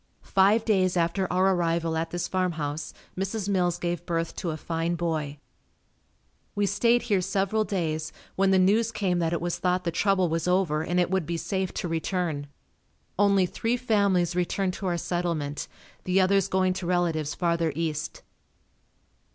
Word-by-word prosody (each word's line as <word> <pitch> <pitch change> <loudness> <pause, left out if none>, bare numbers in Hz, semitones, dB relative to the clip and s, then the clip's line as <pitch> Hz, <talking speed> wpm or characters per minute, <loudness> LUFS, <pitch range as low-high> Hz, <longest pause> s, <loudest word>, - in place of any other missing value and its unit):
Five 200 +4 +3
days 185 -4 +2
after 175 +3 0
our 190 +1 +3
arrival 165 -2 0
at 165 +1 -1
this 175 0 -3
farm 185 -2 0
house, 150 -1 -4 0.2
Mrs. 195 +2 -3
Mills 180 -3 +1
gave 175 -1 -3
birth 165 -1 -1
to 180 - -2
a 155 - -3
fine 165 +2 -2
boy. 155 -4 -2 1.2
We 205 0 +2
stayed 230 +5 +2
here 205 -6 +1
several 200 +3 0
days 160 -6 -2 0.2
when 195 0 +3
the 190 - +4
news 210 +5 +3
came 185 -5 0
that 165 -1 0
it 170 - 0
was 175 0 -2
thought 180 0 +1
the 170 - -1
trouble 190 +1 +2
was 165 +1 -1
over 180 -4 +2
and 175 +2 0
it 175 0 +1
would 190 -4 0
be 170 0 -2
safe 190 +1 -2
to - - -2
return. 165 -3 -2 0.7
Only, 200 -2 +4
three 230 +6 -1
families 200 -7 +2
returned 180 +1 0
to 195 - -2
our 175 -1 0
settlement, 170 -4 -2 0.4
the 185 +1 +2
others 195 0 +3
going 185 -1 +2
to 185 -1 -5
relatives 165 -4 0
farther 170 -2 +1
east. 155 -2 -3
180 Hz, 170 wpm, -26 LUFS, 165-195 Hz, 1.2 s, the